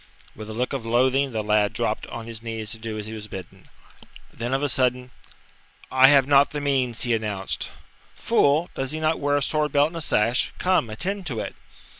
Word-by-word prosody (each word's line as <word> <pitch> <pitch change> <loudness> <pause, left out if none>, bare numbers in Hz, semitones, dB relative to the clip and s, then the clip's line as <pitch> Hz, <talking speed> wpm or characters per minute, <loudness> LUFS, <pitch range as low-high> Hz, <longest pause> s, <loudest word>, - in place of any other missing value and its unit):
With 110 0 -9
a - - -5
look 125 +3 -2
of 135 -4 -3
loathing 130 +4 +2
the 110 -2 -2
lad 105 -1 +2
dropped - - -2
on 115 -1 -7
his 115 -1 -5
knees 110 -2 -5
to 115 - -5
do 110 -1 -5
as 105 - -4
he 110 - -6
was 105 -1 -7
bidden. 95 -3 -10 0.6
Then 120 +2 -4
of 135 +2 0
a - - +2
sudden: 125 -1 0 0.8
"I 130 0 +7
have 140 -1 +6
not 140 0 +5
the 150 - -4
means," 130 -5 0
he 120 -2 +1
announced. 105 -4 -2 0.5
"Fool, 150 +5 +2
does 135 +2 -3
he 155 - -3
not 155 +1 +1
wear 145 0 +1
a 145 - 0
sword 150 +1 0
belt 145 +1 +4
and 170 - -8
a - - -4
sash? 120 -4 +1
Come, 180 -10 +1
attend 185 - -3
to 120 -7 -3
it!" - - -4
125 Hz, 215 wpm, -24 LUFS, 110-145 Hz, 0.8 s, I